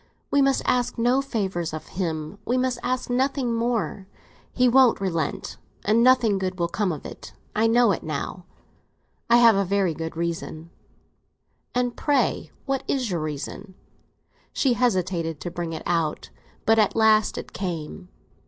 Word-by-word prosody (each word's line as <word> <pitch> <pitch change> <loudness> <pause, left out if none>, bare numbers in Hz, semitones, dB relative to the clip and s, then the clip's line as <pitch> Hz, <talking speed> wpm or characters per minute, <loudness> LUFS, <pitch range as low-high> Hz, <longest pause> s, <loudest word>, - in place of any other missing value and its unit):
"We 285 - +4
must 275 0 +2
ask 245 -1 +1
no 245 +3 +3
favours 190 - -2
of 155 - -8
him—we 175 +6 -3
must 255 -1 0
ask 250 +1 -2
nothing 255 0 0
more. 230 -4 -1 0.4
He 250 0 +3
won't 255 -1 +5
relent, 165 -6 -2 0.3
and 220 +3 +4
nothing 240 -5 +4
good 185 -1 -3
will 170 -1 0
come 200 0 0
of 155 - -6
it. - - -9 0.2
I 220 +2 +3
know 235 -1 +4
it 185 - -2
now—I 180 +8 -4
have 230 -3 +7
a 200 - +2
very 195 -2 +1
good 160 +1 -6
reason." 170 -1 -4 1.0
"And 245 -1 0
pray; 290 -2 0 0.2
what 270 -2 -1
is 255 -6 -1
your 175 - -1
reason?" 155 +6 -6 0.8
She 265 -3 +2
hesitated 185 -9 0
to 175 - -5
bring 170 -1 -4
it 160 - -6
out, 165 -3 -1 0.3
but 225 0 +4
at 210 - +2
last 220 -1 +4
it - - -7
came. 180 0 -5
205 Hz, 155 wpm, -24 LUFS, 170-245 Hz, 1.0 s, have